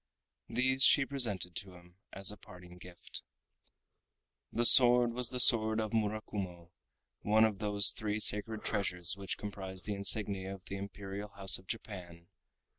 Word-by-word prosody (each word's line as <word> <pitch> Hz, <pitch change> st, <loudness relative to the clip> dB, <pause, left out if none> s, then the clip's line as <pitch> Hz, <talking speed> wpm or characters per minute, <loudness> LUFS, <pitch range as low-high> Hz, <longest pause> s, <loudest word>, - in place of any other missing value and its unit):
These 130 Hz, +1 st, -1 dB
she 140 Hz, -2 st, +6 dB
presented 110 Hz, -10 st, -1 dB
to 95 Hz, -3 st, -5 dB
him 90 Hz, 0 st, -19 dB
as 95 Hz, +1 st, +1 dB
a -, -, -10 dB
parting 90 Hz, -3 st, -15 dB
gift. 90 Hz, 0 st, -5 dB, 1.3 s
The 120 Hz, -, -1 dB
sword 120 Hz, -1 st, +5 dB
was 125 Hz, -1 st, 0 dB
the 125 Hz, -, -4 dB
sword 110 Hz, -2 st, +5 dB
of 110 Hz, -1 st, -3 dB
Murakumo, 100 Hz, -5 st, -4 dB, 0.5 s
one 110 Hz, +2 st, +3 dB
of 105 Hz, -3 st, -3 dB
the 105 Hz, -1 st, -4 dB, 0.2 s
three 105 Hz, -1 st, -3 dB
sacred 110 Hz, +1 st, 0 dB
treasures 90 Hz, -4 st, -2 dB
which 100 Hz, -1 st, -6 dB
comprise 95 Hz, -2 st, -8 dB
the 105 Hz, -, -4 dB
insignia 100 Hz, -1 st, -1 dB
of 95 Hz, -, -18 dB
the 100 Hz, -, -7 dB
Imperial 100 Hz, +1 st, -8 dB
House 100 Hz, -1 st, +3 dB
of 95 Hz, -, -21 dB
Japan. 90 Hz, -6 st, -9 dB
100 Hz, 150 wpm, -32 LUFS, 95-110 Hz, 1.3 s, she